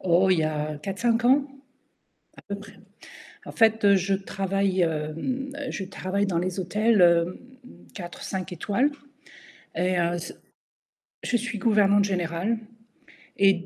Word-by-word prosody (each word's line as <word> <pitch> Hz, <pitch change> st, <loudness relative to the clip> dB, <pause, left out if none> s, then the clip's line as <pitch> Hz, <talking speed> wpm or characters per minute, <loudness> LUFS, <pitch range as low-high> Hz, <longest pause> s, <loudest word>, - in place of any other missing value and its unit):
Oh, 185 Hz, +1 st, +3 dB
il 180 Hz, -, +4 dB
y -, -, +2 dB
a 155 Hz, -1 st, -2 dB
4-5 230 Hz, +7 st, 0 dB
ans, 270 Hz, +3 st, +5 dB, 0.9 s
à -, -, -14 dB
peu 200 Hz, -, -2 dB
près. 205 Hz, 0 st, -12 dB, 0.7 s
En -, -, -7 dB
fait, 225 Hz, -2 st, +3 dB
heu, 200 Hz, -, +7 dB
je 195 Hz, +1 st, +1 dB
travaille 195 Hz, 0 st, -1 dB
hem, 165 Hz, -, -2 dB, 0.2 s
je 195 Hz, -, -4 dB
travaille 195 Hz, +1 st, -2 dB
dans 180 Hz, -4 st, -1 dB
les 180 Hz, +2 st, -2 dB
hôtels 185 Hz, -3 st, +4 dB, 0.7 s
4-5 185 Hz, 0 st, -6 dB
étoiles, 205 Hz, -, +1 dB, 0.9 s
et 180 Hz, +1 st, +1 dB
heu, 170 Hz, 0 st, +1 dB
c 170 Hz, -, -7 dB, 0.9 s
je 245 Hz, -, +1 dB
suis 235 Hz, -2 st, -4 dB
gouvernante 205 Hz, -2 st, +4 dB
générale, 185 Hz, +2 st, -1 dB, 0.8 s
et 195 Hz, 0 st, +6 dB
195 Hz, 130 wpm, -25 LUFS, 175-210 Hz, 0.9 s, heu